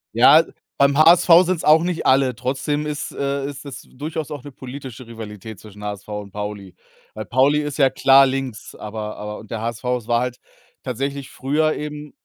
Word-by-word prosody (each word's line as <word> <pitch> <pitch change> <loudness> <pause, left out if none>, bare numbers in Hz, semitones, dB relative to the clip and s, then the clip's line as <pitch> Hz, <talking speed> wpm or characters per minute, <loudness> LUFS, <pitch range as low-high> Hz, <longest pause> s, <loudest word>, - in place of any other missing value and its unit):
Ja, - - +7 0.3
beim 140 0 +3
HSV 170 +2 +7
sind's 180 -2 -1
auch 155 +2 +5
nicht 175 -1 -2
alle, 130 -2 +3
trotzdem 140 +4 -2
ist 150 -1 -4
äh, 140 0 -2
ist 140 0 -7
es 140 - -8
durchaus 155 +2 -6
auch 145 -4 -7
'ne 145 - -9
politische 130 -1 -9
Rivalität 110 -2 -9
zwischen 105 -1 -13
HSV 105 -1 -6
und 105 -1 -6
Pauli. 105 -2 -6 0.4
Weil 110 - -6
Pauli 135 +6 +3
ist 145 -2 -5
ja 135 -3 +5
klar 135 +1 +6
links, 130 -4 -4
aber 105 0 -6
aber 105 0 -6
und 110 - -14
der 110 - -3
HSV 115 +1 -4
es 115 -3 -12
war 120 0 +2
halt 125 0 -4 0.4
tatsächlich 135 +2 -4
früher 155 +4 0
eben 150 -1 -7
135 Hz, 185 wpm, -21 LUFS, 110-145 Hz, 0.4 s, Ja